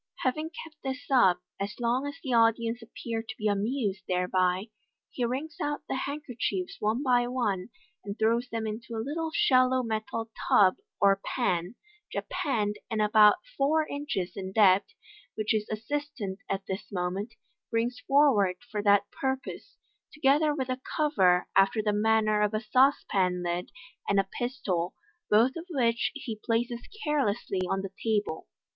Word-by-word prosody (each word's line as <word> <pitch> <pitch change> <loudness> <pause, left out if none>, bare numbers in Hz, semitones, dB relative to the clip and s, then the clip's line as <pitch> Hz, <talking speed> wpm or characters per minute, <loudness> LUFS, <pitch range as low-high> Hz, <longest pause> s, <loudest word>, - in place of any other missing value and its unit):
Having 310 +5 0
kept 315 -1 -14
this 265 +1 -5
up 185 -9 +4 0.2
as 200 +4 -4
long 245 +4 0
as 285 - -5
the 260 - -2
audience 230 0 +3
appear 230 0 -5
to 225 - -8
be 215 - -1
amused 205 -1 0
thereby, 185 +2 +1 0.4
he 250 - -3
wrings 275 +6 -4
out 295 0 -2
the - - -2
handkerchiefs 245 -10 -3
one 220 +6 0
by 245 -2 +3
one, 225 -6 -1 0.3
and 200 +1 -6
throws 230 +3 +1
them 225 -1 -3
into 225 +2 -5
a 220 0 -3
little 320 +3 -2
shallow 255 -4 +3
metal 220 0 -3 0.2
tub 190 -2 +5 0.2
or 195 -1 +4
pan 180 -4 -1 0.4
(japanned, 210 -7 -1
and 220 -2 -2
about 210 0 +6 0.2
four 305 +3 +2
inches 285 -11 -3
in 190 -1 -5
depth), 195 -2 +5 0.5
which 215 -1 -1
his 215 -1 0
assistant 225 -3 -4
at 195 0 -2
this 195 +3 -5
moment 195 +4 -3 0.3
brings 240 +2 -1
forward 250 -9 +4 0.2
for 210 - -1
that 205 -1 +5
purpose, 265 0 -4 0.3
together 300 +1 +3
with 265 -3 -3
a 255 0 -2 0.2
cover 190 -13 +3
after 195 +3 +4
the 210 -1 +1
manner 215 0 +2
of 210 +1 +1
a - - +1
sauce 260 +5 +3
pan 180 -2 +1
lid, 175 +1 -2 0.4
and 200 - +4
a - - +4 0.2
pistol, 200 -9 -2 0.3
both 230 +5 +4
of 335 +1 -7
which 235 -7 +1
he 225 -6 -6
places 235 +1 -1 0.2
carelessly 240 -10 0
on 195 0 -1
the 195 -1 -6
table. 210 - -1
225 Hz, 155 wpm, -28 LUFS, 200-260 Hz, 0.5 s, about